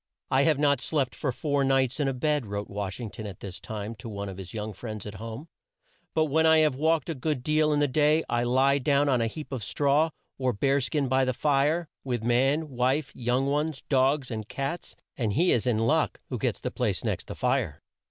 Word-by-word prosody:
"I 135 +1 +4
have 155 -3 +3
not 140 -2 +2
slept 140 -5 0
for 135 - -2
four 140 +2 0
nights 135 0 +2
in 145 - +1
a 135 - 0
bed," 145 -2 0
wrote 100 0 -4
Wash 100 0 -4
ing 115 -4 -5
ton 110 - -7
at 100 - -9
this 95 -3 -7
time 110 0 -5
to 110 +2 -8
one 100 -1 -5
of 95 - -8
his 95 -2 -8
young 110 -1 -4
friends 110 +1 -7
at 105 - -6
home, 115 +7 -7 0.7
"but 155 - +3
when 160 +2 +3
I 160 0 +6
have 155 -3 +4
walked 155 +2 +1
a 165 - -1
good 145 -2 -2
deal 155 +1 +2
in 145 - +2
the 145 - +3
day, 150 +4 +3
I 120 0 0
lie 135 +3 +3
down 140 +1 +2
on 125 -3 +2
a 115 - +1
heap 150 +6 -7
of 130 -5 -4
straw, 145 +8 +2 0.3
or 130 -1 +1
a - - 0
bear 140 +5 +2
skin 140 +1 0
by 130 +1 +3
the 130 0 +1
fire, 150 +5 +1 0.2
with 120 -4 -2
man, 135 +6 +2
wife, 130 +3 0
young 125 +2 0
ones, 145 +1 -1
dogs, 135 0 +2
and 110 -2 -5
cats; 140 +5 -4 0.2
and 110 -5 0
he 175 - +3
is 120 +1 +2
in 120 -3 +2
luck 115 +1 +1
who - - -3
gets - - -1
the - - -4
place - - -1
next - - -2
the - - -6
fire." - - -1
135 Hz, 235 wpm, -27 LUFS, 115-150 Hz, 0.7 s, I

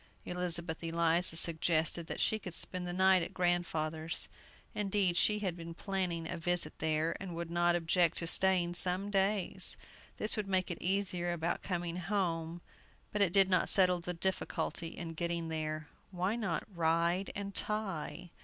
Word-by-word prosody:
Elizabeth 175 -2 -3
Eliza 165 +1 +4
suggested 165 0 +4
that - - -5
she 220 - +1
could 180 -4 -8
spend 180 -1 0
the - - -2
night 190 0 +4
at - - -6
grandfather's. 165 -3 -1 0.4
Indeed, 195 -3 0
she 210 +4 +3
had 190 -5 -3
been 170 -1 -9
planning 180 -4 -2
a 175 - -5
visit 170 -1 0
there, 160 +1 0
and 185 -3 -7
would 170 0 -5
not 175 0 +2
object 170 0 +1
to 170 - 0
staying 180 0 +3
some 185 +3 +2
days. 195 0 0 0.4
This 215 - -1
would 210 -3 -3
make 185 -2 0
it 175 - -6
easier 185 -2 -1
about 170 0 -2
coming 175 -2 -3
home, 175 -3 -2 0.5
but 210 - -2
it 190 -4 +3
did 195 0 +5
not 180 -2 +2
settle 180 -2 +4
the 180 +1 -5
difficulty 185 -1 -2
in 165 0 -7
getting 170 0 -3
there. 155 -1 -4 0.2
Why 185 +3 -2
not 200 -8 -2
"Ride 170 +3 +1
and 200 0 -5
Tie"? 185 -6 -2
175 Hz, 165 wpm, -32 LUFS, 165-190 Hz, 0.5 s, did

